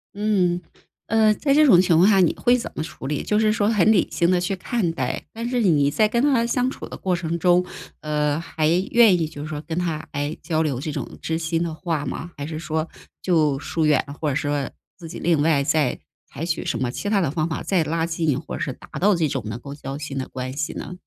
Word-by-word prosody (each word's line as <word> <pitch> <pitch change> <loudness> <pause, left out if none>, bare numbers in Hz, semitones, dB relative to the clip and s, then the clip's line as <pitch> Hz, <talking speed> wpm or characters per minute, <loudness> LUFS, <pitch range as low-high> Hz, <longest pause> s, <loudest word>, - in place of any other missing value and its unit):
嗯， 190 -4 +1 0.5
呃， 220 -1 +4
在 275 +5 +1
这 305 +1 +6
种 185 -11 +7
情 175 -3 +3
况 180 +4 +6
下 200 -2 +5
你 175 -4 +4
会 245 0 +3
怎 245 - -4
么 - - -2
处 145 -4 -8
理？ 145 0 -2
就 210 - +1
是 215 -1 +3
说 205 -1 +1
很 215 -2 +4
理 210 - +3
性 170 - +2
地 180 -1 +3
去 180 +2 -1
看 190 -1 -1
待， 130 -5 -3
但 230 +1 -4
是 250 -1 0
你 150 -9 +3
在 215 +9 +3
跟 235 +2 0
他 265 -4 +3
相 250 +1 +1
处 - - -8
的 - - -8
过 185 -1 -1
程 170 -1 -3
中， 180 +1 +3 0.4
呃， 150 -1 0
还 160 -2 -1 0.2
愿 225 -6 +6
意 160 - 0
就 150 -2 -9
是 150 - -5
说 155 -1 -5
跟 160 +1 -5
他， 165 -3 -3
哎， 145 +2 -3
交 160 0 0
流 145 -6 -1
这 155 +3 -4
种 - - -6
知 160 0 -2
心 165 0 -1
的 165 -2 -3
话 160 -2 -3
吗？ 165 +5 -5
还 145 - -4
是 155 0 -5
说 160 -1 -2 0.4
就 155 -6 +2
疏 155 +3 -2
远， 150 -3 +3 0.2
或 155 - +1
者 135 - -1
说 145 -1 -1 0.3
自 165 -3 -10
己 170 - -7
另 165 -4 +1
外 150 -2 +3
再 145 -2 +1 0.3
采 160 - -5
取 165 -1 -2
什 120 - -2
么 125 -1 -1
其 205 - -4
它 205 -1 +3
的 160 -8 0
方 155 +1 -1
法 155 - -3
再 185 -4 +1
拉 165 +2 -1
近， 160 -4 0
或 160 - -7
者 - - -6
是 140 - -1
达 - - -13
到 205 +2 +4
这 165 -3 +1
种 - - -2
能 110 +2 -5
够 140 +3 -8
交 140 -1 -6
心 145 -2 -5
的 130 - -5
关 130 0 -5
系 145 +1 -2
呢？ - - -6
165 Hz, 275 characters per minute, -23 LUFS, 150-190 Hz, 0.5 s, 种